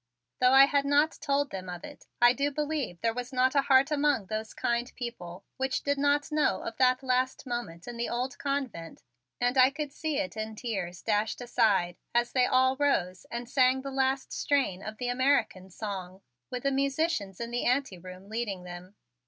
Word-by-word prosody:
Though 250 +1 +5
I 270 +1 +9
had 280 0 +1
not 290 +3 +2
told 285 -2 0
them 185 -1 -6
of 175 -1 -7
it, - - -11
I 240 0 +6
do 280 +2 0
believe 290 - -3
there 230 -1 +1
was 245 +2 -5
not 260 0 +2
a 280 - +4
heart 275 +1 +4
among 290 -7 +2
those 215 +2 -5
kind 240 +1 -1
people 195 -7 -7
which 265 0 -1
did 285 0 0
not 290 +1 +1
know 300 0 +1
of 230 - -5
that 255 0 +3
last 255 +1 0
moment 240 -9 -5
in 240 -1 -6
the 235 - -2
old 250 +2 -3
convent 270 - -4 0.4
and 245 +2 +1
I 255 0 +8
could 285 0 -5
see 310 -3 -2
it 285 -4 -2
in 220 0 -4
tears 195 -7 -4
dashed 210 0 0
aside 210 -8 +1 0.2
as 240 0 +2
they 250 -1 +3
all 260 +1 +3
rose 185 -11 0
and 235 0 -5
sang 260 +1 +3
the 275 - -5
last 265 0 0
strain 270 -10 0
of 215 +1 -7
the 245 -1 -3
American 245 -7 +1
song, 190 -1 -6 0.3
with 250 -1 -5
the 275 - +2
musicians 275 - -1
in 235 0 -4
the 245 - -1
anteroom 190 -8 -2
leading 210 -4 -3
them. 180 +2 -10
250 Hz, 195 wpm, -29 LUFS, 210-275 Hz, 0.4 s, I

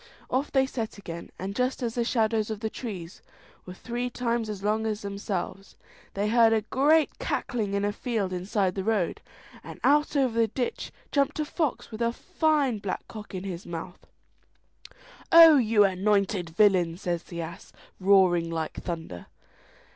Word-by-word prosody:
"' - - -28
Off 265 +3 0
they 265 -1 +3
set 230 -5 -5
again, 170 -4 -8
and 195 +2 -5
just 255 +2 -1
as 230 -2 -1
the 240 - 0
shadows 225 -2 +1
of 215 -2 -4
the 220 0 -3
trees 190 -8 -7 0.5
were 180 - -7
three 245 +4 -4
times 235 -2 -2
as 200 -2 -6
long 215 +2 0
as 210 -1 -3
themselves, 200 -1 -5 0.4
they 200 +1 0
heard 230 0 +5
a 220 - +2
great 295 +7 +2
cackling 210 -5 -2
in 200 0 0
a 205 - -1
field 215 -7 -2
inside 185 +1 0
the 195 - -3
road, 210 -5 0 0.4
and - - -10
out 295 +2 +3
over 250 -4 +1
the 225 - +4
ditch 245 +3 -4 0.2
jumped 285 +1 +1
a 305 - 0
fox 300 -5 -2
with 220 +1 -7
a 235 0 +2
fine 300 - 0
black 200 -2 -4
cock 210 -3 -9
in 185 - -4
his 185 -3 -6
mouth. 170 +2 -8 1.2
"Oh, 330 -2 +10
you 220 -4 +4
anointed 195 -1 +1
villain!" 175 -2 +3
says 175 -3 -2
the 170 -1 -7
ass, 170 +1 -10 0.3
roaring 185 -3 +4
like 160 -1 -4
thunder. 160 - -6
210 Hz, 170 wpm, -27 LUFS, 185-240 Hz, 1.2 s, Oh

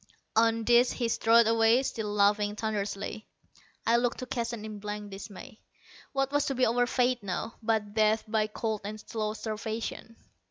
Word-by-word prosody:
On 225 0 +3
this 240 +2 +4
he 240 - -1
strode 230 +1 +5
away, 225 +3 +4
still 220 -5 -3
laughing 205 0 +2
thunderously. 210 0 -3 0.6
I 230 +1 +4
looked 240 0 0
to 255 - -5
Keston 235 -3 -3
in 215 -1 -7
blank 210 0 -6
dismay. 200 +2 -10 0.5
What 270 0 0
was 290 0 +1
to 275 - -1
be 255 0 +3
our 245 +2 +2
fate 250 -1 +1
now, 200 +3 -4
but 215 -2 0
death 215 0 +3
by 215 -1 +1
cold 215 0 -3
and 215 +1 -6
slow 215 -1 -3
starvation! 220 +1 -5
220 Hz, 165 wpm, -29 LUFS, 210-235 Hz, 0.6 s, strode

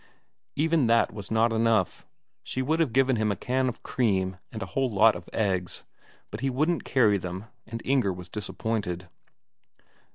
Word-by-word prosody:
Even 160 -3 +2
that 115 -1 +3
was 105 -2 -7
not 115 +1 +2
enough; 110 -4 +1 0.3
she 130 - -3
would 160 +5 +1
have 160 -7 +2
given 130 0 +3
him 110 -1 +1
a - - -1
can 130 +6 0
of 125 - -8
cream 95 -7 0
and 110 -1 -5
a - - -10
whole 135 -1 +1
lot 110 +1 +5
of - - -9
eggs, 95 -5 -1 0.5
but - - -5
he 135 - 0
wouldn't 155 +6 0
carry 105 -6 +3
them, 90 +3 -6 0.2
and 115 0 -6
Inger 130 -7 +2
was 90 -1 -7
disappointed. 100 -2 -3
115 Hz, 170 wpm, -27 LUFS, 100-130 Hz, 0.5 s, lot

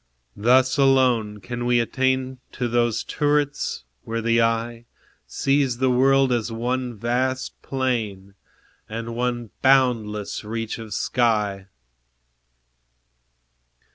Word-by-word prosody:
Thus 130 +5 +3
alone 125 -6 +3
can 120 +3 -5
we 120 0 +3
attain 130 +2 0
To 125 - -2
those 120 -1 +1
turrets, 145 -1 -1 0.2
where 115 0 -4
the 115 +1 +2
eye 115 +1 -1 0.4
Sees 135 -3 +1
the 130 0 +2
world 135 +1 +4
as 120 -1 -1
one 120 +1 -2
vast 130 +4 -2
plain, 110 -8 -3 0.6
And 115 +1 -5
one 120 -2 -2
boundless 115 -7 +2
reach 115 +1 -4
of 110 -2 -6
sky. 105 -5 0
120 Hz, 105 wpm, -23 LUFS, 115-130 Hz, 0.6 s, world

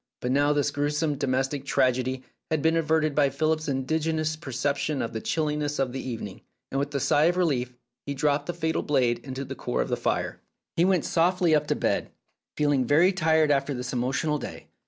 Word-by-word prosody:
But 125 - -2
now 145 +2 +3
this 145 -1 +1
gruesome 150 +1 0
domestic 135 0 -1
tragedy 130 -1 +1 0.3
had 155 -2 0
been 160 +1 +3
averted 155 -1 +1
by 140 -1 +3
Philip's 155 +3 0
ingenious 155 +3 0
perception 140 0 -2
of 115 - -3
the 110 - -3
chilliness 150 0 -1
of 135 -2 0
the 130 - -4
evening, 110 -6 -6 0.3
and 135 - 0
with 140 +1 -2
a - - +2
sigh 145 +3 +3
of 175 +2 +2
relief 130 -8 0 0.3
he 140 - -2
dropped 145 +1 +1
the 175 - -2
fatal 160 -2 -1
blade 125 -5 +1
into 135 0 -5
the - - -6
core - - -3
of - - -8
the - - +1
fire. - - -2 0.3
He 170 - +3
went 185 -4 +2
softly 175 0 +2
up 150 -1 +2
to - - +1
bed, - - 0 0.5
feeling 145 -3 +2
very 160 +9 +4
tired 160 -4 +3
after 140 0 +1
this 125 +1 -5
emotional 130 +5 0
day. - - -8
145 Hz, 200 wpm, -26 LUFS, 130-155 Hz, 0.5 s, very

